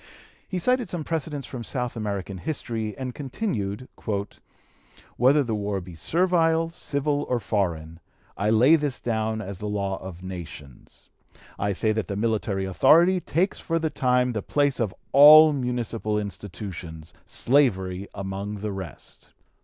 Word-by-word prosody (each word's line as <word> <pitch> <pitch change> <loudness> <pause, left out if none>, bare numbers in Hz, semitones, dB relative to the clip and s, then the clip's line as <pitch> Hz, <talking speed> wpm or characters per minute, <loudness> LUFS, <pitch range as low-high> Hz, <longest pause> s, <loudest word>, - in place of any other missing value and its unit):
He 185 - -3
cited 250 +3 +1
some 175 -3 -4
precedents 150 -3 -3
from 120 -2 -7
South 125 -1 -2
American 100 -3 -4
history, 115 - -4
and 130 -2 -4
continued: 130 - -3 1.3
"Whether 140 +4 +4
the 115 -3 -3
war 100 -2 -2
be 90 -1 -10
servile, 165 - +1
civil, 145 -2 -1
or 125 - +1
foreign, 85 -6 -2 0.4
I 100 +2 0
lay 125 +9 +6
this 145 -4 -2
down 110 -1 -1
as 100 -2 -7
the 105 - -4
law 100 -2 -2
of 90 -1 -9
nations. 85 -8 -10 0.5
I 100 0 0
say 110 +3 +1
that 110 -4 -2
the 100 - -3
military 105 -2 -1
authority 165 - +5
takes 180 +3 -1
for 165 - -1
the 160 -1 -1
time 125 -2 +2
the 105 - -2
place 145 +2 +1
of 110 -5 0 0.2
all 150 +2 +9
municipal 120 -5 -2
institutions, 95 -5 -7
slavery 100 -8 +1
among 100 +1 -4
the 105 0 -3
rest. 95 -8 -9
110 Hz, 145 wpm, -25 LUFS, 100-145 Hz, 1.3 s, all